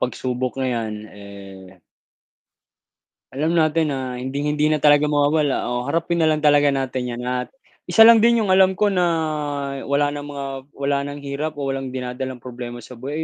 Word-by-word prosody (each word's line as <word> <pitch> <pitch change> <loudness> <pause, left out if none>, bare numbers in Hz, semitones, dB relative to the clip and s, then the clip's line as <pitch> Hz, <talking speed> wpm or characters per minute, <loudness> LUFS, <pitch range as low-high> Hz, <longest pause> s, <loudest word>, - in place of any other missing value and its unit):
pagsubok 125 +1 -3
na 130 - 0
yan 110 -2 -3 0.2
eh 95 -2 -13 1.5
alam 155 +5 -1
natin 155 -2 +2
na 130 -2 -5
hinding 140 +3 -2
hindi 150 0 +1
na 155 - +2
talaga 145 0 +5
mawawala 145 0 +1
o 125 +2 -3
harapin 165 +2 -1
na 160 - +3
lang 155 -1 0
talaga 145 -1 +5
natin 130 -3 -2
yan 125 - -7
at 125 0 -2 0.4
isa 225 - +6
lang 230 0 +8
din 235 0 +4
yung 190 - 0
alam 190 0 +5
ko 205 +1 +2
na 180 -2 +2 0.8
wala 145 +1 +1
ng 145 0 -6
mga 140 -1 -6 0.3
wala 140 0 0
ng 145 0 -7
hirap 145 +3 -4
o 145 - -5
walang 135 -1 -5
dinadalang 125 0 -5
problema 120 -1 -8
sa 125 -2 -12
buhay, 145 +5 -4
140 Hz, 175 wpm, -21 LUFS, 125-155 Hz, 1.5 s, lang